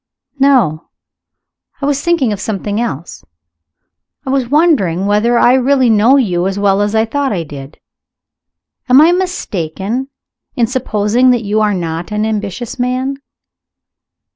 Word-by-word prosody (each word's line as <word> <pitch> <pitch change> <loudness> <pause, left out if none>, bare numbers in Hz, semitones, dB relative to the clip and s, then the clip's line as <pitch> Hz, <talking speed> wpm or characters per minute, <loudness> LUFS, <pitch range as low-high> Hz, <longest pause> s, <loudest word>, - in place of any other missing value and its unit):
"No; 250 - +2 0.9
I 280 - -3
was 285 -1 0
thinking 300 -10 +1
of 195 - -6
something 210 +1 -3
else. 170 - -5 1.0
I 265 - -2
was 265 -3 -1
wondering 255 - +2
whether 210 +4 +2
I 240 - +4
really 260 -1 +3
know 225 +6 +4
you 185 -8 0
as 195 0 -3
well 200 0 +2
as 205 +1 -1
I 220 0 +2
thought 280 +4 -2
I 180 -5 -2
did. 145 -1 -10 1.1
Am 255 +2 +7
I 320 +3 +6
mistaken 235 - -3 0.5
in 240 - +2
supposing 235 0 +1
that 245 -2 +2
you 210 +1 0
are 210 -2 +1
not 170 +1 -4
an 210 +1 -1
ambitious 215 +2 -4
man?" 255 +2 -1
220 Hz, 140 wpm, -14 LUFS, 195-260 Hz, 1.1 s, Am